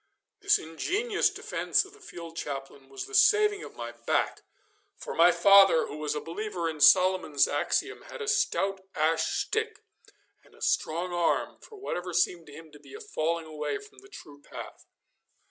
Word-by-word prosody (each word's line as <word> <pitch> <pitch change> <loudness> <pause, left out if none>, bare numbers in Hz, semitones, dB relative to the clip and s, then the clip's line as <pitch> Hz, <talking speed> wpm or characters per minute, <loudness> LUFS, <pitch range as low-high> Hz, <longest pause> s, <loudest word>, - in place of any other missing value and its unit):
This 405 0 +3
ingenious 410 - -1
defence - - -1
of 390 - -16
the 425 - -18
field 170 - -10
chaplain 135 -3 -7
was 135 - -6
the 420 - -14
saving 420 -1 +4
of - - -11
my 120 0 -6
back, 120 0 -1 0.6
for - - -7
my 170 +2 +6
father, 195 0 +6
who 150 - -8
was 150 -1 -3
a - - -1
believer 175 +1 -4
in 155 -2 -5
Solomon's 185 -5 +5
axiom, - - -1
had - - -9
a 440 - -5
stout 195 - 0
ash 160 +1 +1
stick 440 0 -3 0.6
and - - -23
a - - -21
strong 175 +3 -1
arm 175 -1 0
for 440 - -14
whatever 180 - -4
seemed 175 -1 0
to - - -12
him 160 +1 -12
to 150 - -15
be 280 - -14
a - - -9
falling 170 - -2
away 150 -1 -4
from 420 0 -15
the 395 - -18
true 145 - -13
path. - - -11
175 Hz, 180 wpm, -28 LUFS, -, 0.6 s, my